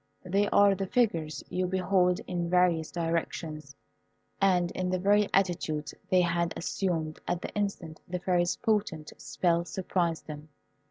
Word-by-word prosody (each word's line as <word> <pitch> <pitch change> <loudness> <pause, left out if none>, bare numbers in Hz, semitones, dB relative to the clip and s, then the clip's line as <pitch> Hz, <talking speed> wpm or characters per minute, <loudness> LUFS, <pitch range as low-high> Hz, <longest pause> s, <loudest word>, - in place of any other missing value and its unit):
They 200 +3 +1
are 200 0 +5
the 195 0 -3
figures 165 - 0
you 185 0 -1
behold 185 0 +2
in 175 -2 -2
various 175 -3 +3
directions 165 -3 -3 0.7
and 180 -3 +3
in 185 0 -2
the 185 - +1
very 205 +2 +3
attitudes 165 -5 0 0.2
they 185 -1 +5
had 170 -1 0
assumed 165 -4 -2
at 175 0 -2
the - - -5
instant 195 -6 -3
the 180 - -3
Fairy's 175 -1 +1
potent 205 -9 -1
spell 170 -1 +1
surprised 175 -2 -2
them. 150 0 -9
180 Hz, 145 wpm, -29 LUFS, 165-190 Hz, 0.7 s, are